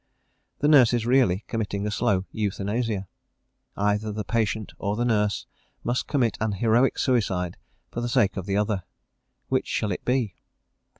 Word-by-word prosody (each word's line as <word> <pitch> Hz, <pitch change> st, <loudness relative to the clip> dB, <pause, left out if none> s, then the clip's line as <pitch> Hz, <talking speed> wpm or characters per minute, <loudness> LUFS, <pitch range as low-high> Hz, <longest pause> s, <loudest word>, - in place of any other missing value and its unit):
The 145 Hz, -, +3 dB
nurse 135 Hz, -6 st, +6 dB
is 120 Hz, -2 st, +1 dB
really 120 Hz, -6 st, +3 dB
committing 105 Hz, -3 st, -2 dB
a 105 Hz, -, -1 dB
slow 95 Hz, -2 st, +1 dB
euthanasia. 105 Hz, 0 st, -1 dB, 0.7 s
Either 105 Hz, +1 st, +1 dB
the 105 Hz, +1 st, -3 dB
patient 110 Hz, -1 st, -1 dB
or 100 Hz, +1 st, -1 dB
the 120 Hz, +2 st, 0 dB
nurse 105 Hz, -3 st, +1 dB, 0.4 s
must 120 Hz, +1 st, -1 dB
commit 125 Hz, -6 st, +1 dB
an 110 Hz, -2 st, +1 dB
heroic 115 Hz, +6 st, +3 dB
suicide 95 Hz, -8 st, +1 dB, 0.4 s
for 120 Hz, -, -3 dB
the 120 Hz, -, -2 dB
sake 115 Hz, -5 st, +2 dB
of 95 Hz, -1 st, -5 dB
the 100 Hz, 0 st, +1 dB
other 105 Hz, -2 st, 0 dB, 0.7 s
which -, -, +1 dB
shall 105 Hz, -, -1 dB
it 90 Hz, -, -4 dB
be? 125 Hz, -6 st, 0 dB
110 Hz, 160 wpm, -25 LUFS, 100-120 Hz, 0.7 s, nurse